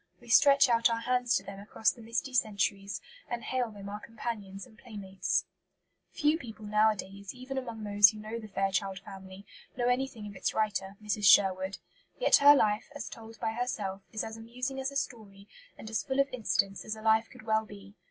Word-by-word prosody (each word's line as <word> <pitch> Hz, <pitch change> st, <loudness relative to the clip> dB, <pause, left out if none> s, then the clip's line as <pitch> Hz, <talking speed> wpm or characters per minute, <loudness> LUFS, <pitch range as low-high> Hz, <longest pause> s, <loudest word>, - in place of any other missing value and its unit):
We 240 Hz, -, -16 dB
stretch 280 Hz, +3 st, +7 dB
out 235 Hz, -1 st, +4 dB
our 230 Hz, 0 st, -1 dB
hands 250 Hz, 0 st, +1 dB
to 190 Hz, -, 0 dB
them 195 Hz, 0 st, -9 dB
across 210 Hz, +2 st, +1 dB
the 240 Hz, -, -14 dB
misty 230 Hz, +4 st, -3 dB
centuries, 200 Hz, -3 st, 0 dB, 0.3 s
and 240 Hz, -1 st, -4 dB
hail 255 Hz, -2 st, -1 dB
them 200 Hz, -2 st, -10 dB
our 205 Hz, +1 st, -5 dB
companions 210 Hz, -4 st, -6 dB
and 220 Hz, -, -19 dB
playmates. 205 Hz, -5 st, -2 dB, 0.7 s
Few 305 Hz, +2 st, +2 dB
people 220 Hz, -4 st, -9 dB
nowadays, 205 Hz, -1 st, 0 dB
even 255 Hz, +2 st, -7 dB
among 235 Hz, -4 st, -5 dB
those 205 Hz, -1 st, +7 dB
who 215 Hz, -, -7 dB
know 215 Hz, +2 st, -6 dB
the 220 Hz, -, -9 dB
Fairchild 195 Hz, -1 st, -1 dB
Family, 195 Hz, 0 st, -11 dB, 0.3 s
know 245 Hz, 0 st, +1 dB
anything 245 Hz, -3 st, -1 dB
of 205 Hz, -1 st, -9 dB
its -, -, -2 dB
writer, 200 Hz, -2 st, -1 dB
Mrs. 210 Hz, 0 st, -1 dB
Sherwood. 190 Hz, 0 st, +5 dB, 0.4 s
Yet -, -, +5 dB
her 285 Hz, +1 st, +8 dB
life, 210 Hz, -4 st, +1 dB
as 290 Hz, -, -5 dB
told 225 Hz, -1 st, -11 dB
by 220 Hz, -, -1 dB
herself, 210 Hz, -5 st, -3 dB
is 220 Hz, -, -3 dB
as 220 Hz, 0 st, -6 dB
amusing 250 Hz, +4 st, -5 dB
as 265 Hz, +1 st, -2 dB
a -, -, -11 dB
story, 210 Hz, -8 st, -5 dB, 0.3 s
and -, -, -10 dB
as 220 Hz, 0 st, -1 dB
full 265 Hz, 0 st, -2 dB
of 275 Hz, 0 st, +3 dB
incidents 200 Hz, -5 st, 0 dB
as 215 Hz, -, -4 dB
a 220 Hz, -, -11 dB
life 220 Hz, 0 st, +3 dB
could -, -, -14 dB
well 220 Hz, 0 st, +1 dB
be. 200 Hz, -1 st, -12 dB
220 Hz, 200 wpm, -30 LUFS, 200-240 Hz, 0.7 s, her